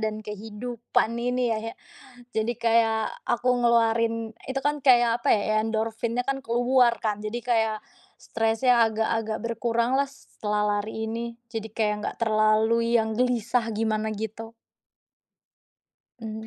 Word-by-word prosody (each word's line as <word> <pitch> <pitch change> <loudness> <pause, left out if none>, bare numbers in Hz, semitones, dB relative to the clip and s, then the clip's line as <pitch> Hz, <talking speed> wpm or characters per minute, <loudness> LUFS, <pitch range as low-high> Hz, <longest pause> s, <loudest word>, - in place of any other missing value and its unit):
dan 215 0 -3
kehidupan 220 +3 -2 0.2
ini 250 -1 0
ya - - 0
yak, 230 - -7 0.6
jadi 220 +2 +1
kayak, 225 -1 +4 0.3
aku 245 +1 0
ngeluarin 230 -1 +3 0.3
itu 270 +1 -2
kan 295 0 +1
kayak, 240 -2 +5
apa - - -2
ya, 215 +1 +1
endorfinnya 225 +2 -1
kan 270 0 0
keluar 245 +1 +3
kan. 210 -1 +1
Jadi 215 +3 -4
kayak, 220 -3 +1 0.4
stresnya 225 +1 +2
agak-agak 220 0 -1
berkuranglah 235 +4 0
setelah 210 -6 -4 0.2
lari 220 +2 -4
ini. 235 +1 -4 0.2
Jadi 220 -1 -4
kayak 210 -2 +1
enggak - - -4
terlalu 215 +1 +3 0.2
yang 220 -1 +1
gelisah 245 -1 +1
gimana 220 -1 0
gitu. 220 +2 -6 1.7
Mmm. 220 0 -6
225 Hz, 130 wpm, -26 LUFS, 220-240 Hz, 1.7 s, kayak